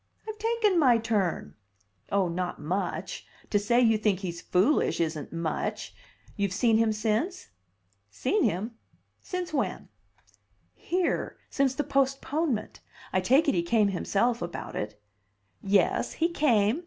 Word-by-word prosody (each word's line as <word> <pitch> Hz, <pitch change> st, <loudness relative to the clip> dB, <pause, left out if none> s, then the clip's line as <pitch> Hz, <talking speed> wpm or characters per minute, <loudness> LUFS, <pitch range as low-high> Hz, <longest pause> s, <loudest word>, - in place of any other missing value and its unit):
"I've 435 Hz, -1 st, -6 dB
taken 440 Hz, -4 st, +2 dB
my 250 Hz, -6 st, +5 dB
turn!" 200 Hz, -, -1 dB, 0.6 s
"Oh, 200 Hz, -2 st, +2 dB
not 175 Hz, +1 st, -3 dB
much. 180 Hz, +4 st, -3 dB, 0.2 s
To 205 Hz, -, +3 dB
say 235 Hz, +4 st, +3 dB
you 225 Hz, -3 st, +4 dB
think 205 Hz, -3 st, +1 dB
he's 170 Hz, -3 st, -5 dB
foolish 205 Hz, +14 st, +2 dB
isn't 155 Hz, -3 st, -2 dB
much. 165 Hz, -1 st, -3 dB, 0.4 s
You've 200 Hz, -3 st, -1 dB
seen 225 Hz, +2 st, +3 dB
him 225 Hz, -1 st, +3 dB
since?" 220 Hz, -, -1 dB, 0.6 s
"Seen 310 Hz, -, 0 dB
him? 195 Hz, +8 st, 0 dB, 0.5 s
Since 360 Hz, -3 st, -4 dB
when?" 275 Hz, -, -2 dB, 0.8 s
"Here. 360 Hz, 0 st, -1 dB
Since 270 Hz, -2 st, +1 dB
the 295 Hz, -, 0 dB
postponement. 275 Hz, -2 st, -1 dB, 0.3 s
I 185 Hz, -, +2 dB
take 265 Hz, +11 st, +4 dB
it -, -, +4 dB
he 175 Hz, -, +2 dB
came 205 Hz, +4 st, +2 dB
himself 210 Hz, +5 st, 0 dB
about 175 Hz, 0 st, -5 dB
it." 105 Hz, 0 st, -4 dB, 0.6 s
"Yes, 195 Hz, 0 st, +2 dB
he 335 Hz, +1 st, +1 dB
came. 245 Hz, -6 st, +2 dB
220 Hz, 135 wpm, -28 LUFS, 185-275 Hz, 0.8 s, my